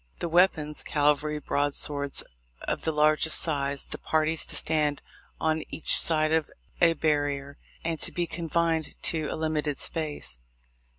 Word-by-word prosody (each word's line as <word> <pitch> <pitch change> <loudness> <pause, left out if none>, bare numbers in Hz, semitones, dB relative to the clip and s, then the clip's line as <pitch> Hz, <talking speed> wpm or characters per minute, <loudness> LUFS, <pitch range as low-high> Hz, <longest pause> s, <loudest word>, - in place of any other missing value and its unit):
The - - -3
weapons, 160 -3 +2
cavalry 150 +1 +1
broadswords 145 0 0 0.4
of - - -3
the 160 - -1
largest 155 +1 +3
size; 140 -3 0
the - - -7
parties 160 0 0
to - - 0
stand 150 -2 +1 0.4
on 160 0 0
each 160 - +6
side 155 -1 +2
of 160 -2 +1 0.3
a 170 -1 +5
barrier, 145 -2 -1 0.3
and 165 -2 -2
to - - -1
be 175 - -2
confined 165 -1 -2
to 160 -2 0
a - - -4
limited 155 -2 -2
space. 145 - -4
155 Hz, 140 wpm, -27 LUFS, 145-160 Hz, 0.4 s, each